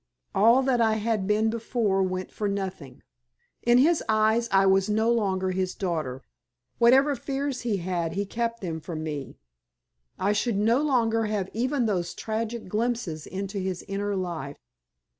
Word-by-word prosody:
All 230 +7 +5
that 255 -3 +2
I 220 -1 +4
had 215 -3 -1
been 215 +1 +2
before 225 -4 0
went 185 0 -2
for 210 - -2
nothing. 190 -10 -5 0.6
In 240 +1 +4
his 310 +6 +4
eyes 220 +2 +2
I 195 0 +5
was 195 +1 +3
no 220 +2 +2
longer 190 -5 0
his 185 0 -2
daughter. 155 -9 -3 0.6
Whatever 270 +5 +5
fears 275 0 -3
he 230 -4 0
had 170 -2 -2
he 200 +3 -1
kept 230 +3 -3
them 165 -4 -3
from 155 -1 -5
me. 150 -3 -5 0.8
I 200 +2 +1
should 210 +1 0
no 230 +6 +3
longer 230 -6 +2
have 205 -3 -2
even 255 +3 0
those 180 -5 -1
tragic 225 0 -4
glimpses 215 -6 -2
into 195 +1 -4
his 185 -2 -4
inner 200 +1 -2
life. 170 -7 -4
210 Hz, 160 wpm, -26 LUFS, 185-230 Hz, 0.8 s, All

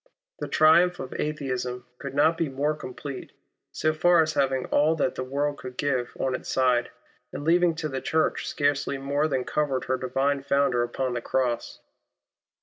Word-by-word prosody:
The - - -3
triumph 175 +3 +4
of 130 - -6
Atheism 130 -5 -3
could 140 -1 -6
not 160 +3 +4
be 165 -2 -1
more 140 +3 0
complete, 140 -1 -8 0.4
so 155 0 0
far 170 +1 +4
as 155 0 -2
having 135 -2 +1
all 155 +2 +2
that 145 -4 0
the 130 - -4
world 140 +2 -2
could 125 -1 -9
give 130 -4 -1
on 130 - 0
its - - -5
side, 125 -2 +2 0.4
and - - -6
leaving 170 +1 +3
to 160 -1 -3
the 135 -2 -4
Church 160 0 0
scarcely 145 -1 0
more 140 +3 0
than 135 -4 -1
covered 140 -3 -1
her 130 - -1
Divine 135 +2 0
Founder 140 -3 +2
upon 125 +1 -2
the 120 - -2
Cross. 120 -2 -2
140 Hz, 175 wpm, -26 LUFS, 130-155 Hz, 0.4 s, triumph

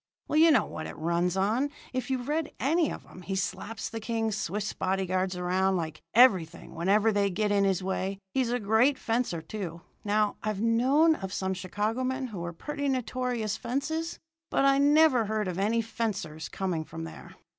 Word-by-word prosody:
"Well, 305 - +2
you 330 +1 +7
know 295 - +4
how - - -8
it 155 - -6
runs 170 +3 0
on, 220 +9 +1 0.2
if 255 +1 -2
you've 255 -1 -2
read 310 +1 -1
any 320 +4 +2
of - - -8
'em 185 - -13
he 195 +2 -4
slaps 190 +3 -3
the 225 - -5
king's 225 -1 -1
Swiss 205 +1 -2
body 190 0 -1
guards 185 0 -1
around 185 +2 +1
like 160 -3 -4
everything 185 -9 +4
whenever 205 +6 +3
they 200 -1 +2
get 210 +2 0
in 200 -1 +3
his 190 -1 +1
way. 190 +1 -2 0.2
He's 260 -3 +1
a 245 - 0
great 220 +6 +3
fencer, 225 -10 -1
too. 170 -2 -6 0.2
Now, 210 0 +1
I've 215 -2 -2
known 255 +9 +4
of 190 -10 -5
some 190 0 -1
Chicago 205 +6 -2
men 260 +1 -1
who 200 -5 -6
were 170 0 -4
pretty 285 - -3
notorious 250 -4 -1
fences, 300 +7 -2 0.3
but 275 - +2
I 275 0 +5
never 290 -4 +5
heard 215 -1 -1
of 180 0 -3
any 225 +3 +1
fencers 195 -9 -3
coming 180 -5 -2
from 165 +1 -8
there. 165 - -10
210 Hz, 190 wpm, -28 LUFS, 185-255 Hz, 0.3 s, you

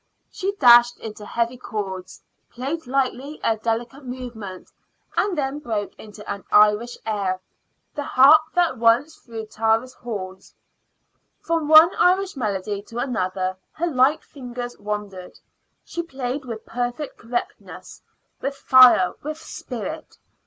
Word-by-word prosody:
She 390 +2 -3
dashed 240 -8 +6
into 215 -1 -8
heavy 235 +1 -1
chords, 190 -6 -6 0.3
played 270 +5 -5
lightly 270 +2 -2
a 225 - +2
delicate 235 +5 -3
movement, 240 -7 -8 0.4
and 390 -4 0
then 280 0 -2
broke 220 -7 -3
into 210 -1 -12
an 200 -1 -5
Irish 210 +3 +4
air, 200 -4 -1 0.5
"The 295 - -4
Harp 285 +3 +6
that 340 -9 +2
once 235 +7 +3
through 225 -2 -8
Tara's 225 +3 0
Halls." 190 -7 -8 0.8
From 330 -2 -1
one 315 +3 +8
Irish 375 +1 +3
melody 205 -4 -3
to 230 +3 -11
another 185 -7 -2 0.2
her 335 - -2
light 280 -1 +2
fingers 245 -3 -7
wandered. 205 -3 -6 0.5
She 340 - -4
played 270 -4 -5
with 225 -3 -7
perfect 245 +4 -4
correctness 240 +1 -6 0.4
with 275 +1 -3
fire, 255 -10 +6
with 305 +2 -5
spirit. 305 -2 -7
245 Hz, 125 wpm, -23 LUFS, 215-280 Hz, 0.8 s, one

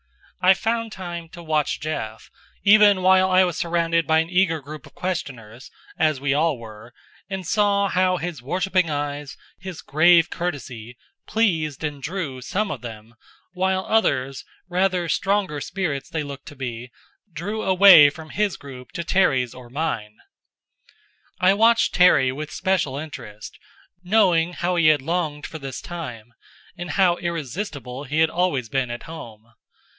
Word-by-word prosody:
I 185 +1 +7
found 230 +1 -2
time 175 -4 -7
to 170 0 -11
watch 155 -2 0
Jeff, 115 -8 -5 0.3
even 205 -2 +6
while 185 0 +5
I 185 0 +5
was 175 -3 -1
surrounded 170 -1 0
by 160 - +4
an 165 +2 0
eager 180 -3 +2
group 150 +2 -10
of - - -20
questioners 130 -10 -5 0.3
as 155 -4 +2
we 140 +1 0
all 155 -1 +1
were 115 0 -12 0.4
and 190 -2 -5
saw 200 +2 +2
how 185 -1 +1
his 170 -6 -5
worshipping 180 +5 0
eyes, 145 -1 -4 0.2
his 180 -2 -8
grave 165 +3 +4
courtesy, 125 -9 -5 0.3
pleased 160 - 0
and 145 -2 -4
drew 145 -5 -4
some 200 +10 -2
of - - -5
them; 115 -1 -10 0.4
while 190 +1 0
others, 135 -12 +1 0.2
rather 180 -1 0
stronger 190 -5 0
spirits 155 -8 -3
they 160 -1 -3
looked 140 -1 -9
to 145 - -10
be, 125 -2 -6 0.4
drew 200 +8 -4
away 185 -6 +8
from 155 +2 -11
his 210 -2 -1
group 130 -3 -11
to 170 - -4
Terry's 135 -10 +2
or 125 -1 -12
mine. 115 -7 -3 1.2
I 185 +1 +5
watched 230 +3 +3
Terry 155 -8 +5
with 150 +3 -6
special 185 -8 0
interest, 125 -9 -9 0.4
knowing 180 -3 +3
how 175 +1 -1
he 165 -2 +4
had 150 -3 +4
longed 155 -2 -2
for 160 - -7
this 135 -3 -6
time, 120 -10 -8 0.4
and 175 0 -7
how 180 -3 +3
irresistible 150 - -5
he 150 +4 0
had 160 0 +3
always 170 -9 0
been 130 -1 -1
at 120 0 -6
home. 115 -8 -11
160 Hz, 155 wpm, -23 LUFS, 135-185 Hz, 1.2 s, away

